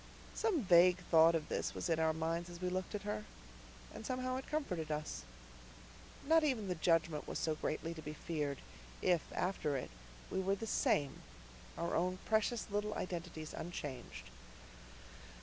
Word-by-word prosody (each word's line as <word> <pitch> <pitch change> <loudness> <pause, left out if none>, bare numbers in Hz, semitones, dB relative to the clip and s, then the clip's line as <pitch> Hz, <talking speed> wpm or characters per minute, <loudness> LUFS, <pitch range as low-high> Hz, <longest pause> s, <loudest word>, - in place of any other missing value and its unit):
Some 400 - +1
vague 180 -1 +7
thought 165 0 +7
of 155 -2 -1
this - - -2
was - - -2
in 165 -2 +2
our 160 0 +4
minds 165 +2 -1
as 175 -1 -9
we 180 0 -1
looked 185 +3 -2
at 205 - -4
her; 210 +1 -2 0.7
and - - -7
somehow 255 +2 -1
it 265 - -6
comforted 180 - -2
us. 150 0 -3 1.0
Not 320 +2 +5
even 250 -9 +1
the 180 - +1
Judgment 165 -2 +2
was - - -3
so 160 - +1
greatly 155 +2 -2
to 160 - -8
be 150 0 -5
feared 150 -5 -2 0.5
if 175 -3 +4
after 155 -6 0
it 125 - -5 0.4
we - - 0
were 195 +1 +2
the 225 - -5
SAME, 145 -9 +1 0.6
our 170 0 -1
own 180 +2 +1
precious 220 +1 +2
little 210 +1 0
identities 170 -3 -4
unchanged. 145 - -6
175 Hz, 165 wpm, -36 LUFS, 160-210 Hz, 1.0 s, vague